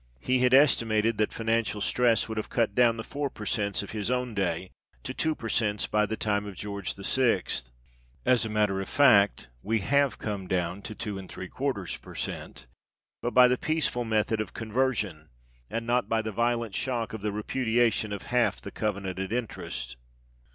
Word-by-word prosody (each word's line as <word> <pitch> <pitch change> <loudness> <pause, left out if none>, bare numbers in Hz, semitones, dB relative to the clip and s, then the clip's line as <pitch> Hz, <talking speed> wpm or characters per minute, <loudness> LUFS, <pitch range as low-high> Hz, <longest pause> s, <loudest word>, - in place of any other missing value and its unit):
He 130 - +1
had 125 0 +3
estimated 115 -5 +4
that 105 - +2
financial 115 -2 0
stress 115 0 +2
would 110 -1 -3
have - - -5
cut 115 -4 +1
down 115 0 +4
the 115 - -4
4 145 +2 -3
per 110 -4 -9
cents 100 -1 0
of 100 - -8
his 105 0 -3
own 125 -1 -1
day 95 -2 -1 0.3
to - - -4
2 160 -1 0
per 115 - -6
cents 105 -2 +1
by 105 0 +1
the 110 - -3
time 105 -1 0
of 100 - -7
George 100 0 -4
VI. 105 0 +2 0.8
As 125 -1 +4
a 110 - -2
matter 105 -2 +1
of 95 - -6
fact, 105 - +4
we 110 0 0
have 140 +3 +2
come 100 -3 -4
down 90 +1 -1
to 110 +1 -7
2| 100 +2 -3
per - - -12
cent., - - -3 0.6
but 120 - -3
by 125 0 +9
the 125 0 +1
peaceful 155 -6 0
method 110 -1 +1
of 105 - -7
Conversion, 110 - -1 0.4
and 115 0 -3
not 120 +1 +1
by 115 0 +1
the 110 - -3
violent 115 0 0
shock 120 -2 -2
of 110 - -5
the 105 0 -1
repudiation 110 0 +1
of 100 - -5
half 125 -1 +2
the - - -8
covenanted 95 -2 -3
interest. 105 - -4
110 Hz, 180 wpm, -28 LUFS, 100-120 Hz, 0.8 s, by